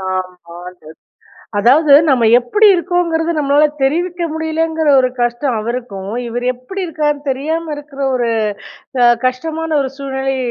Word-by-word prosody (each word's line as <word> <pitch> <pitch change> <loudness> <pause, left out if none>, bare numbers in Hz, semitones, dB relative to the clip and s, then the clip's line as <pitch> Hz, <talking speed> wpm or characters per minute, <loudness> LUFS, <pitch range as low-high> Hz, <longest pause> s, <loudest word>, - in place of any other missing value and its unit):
ஆமாங்க. 180 -1 -6 0.8
அதாவது, 280 +8 +4 0.2
நம்ம 245 -4 +3
எப்புடி 415 - +3
இருகோங்கிறது, 340 -2 0
நம்மளால 290 +1 +3 0.2
தெரிவிக்க 345 +5 -1
முடியலங்குற 320 0 -1
ஒரு 255 - +1
கஷ்டம் 240 +1 -1
அவருக்கும், 215 -4 -5 0.2
இவரு 245 +2 -3
எப்படி 375 +11 -6
இருக்கார்ன்னு 295 -2 -2
தெரியாம 315 +4 -3
இருக்குற 290 -1 -9
ஒரு 240 -2 0 0.7
அ - - +6 0.2
கஷ்டமான 320 +6 -2
ஒரு 265 - -2
சூழ்நிலை, 270 -1 -3
275 Hz, 120 wpm, -16 LUFS, 240-320 Hz, 0.8 s, அ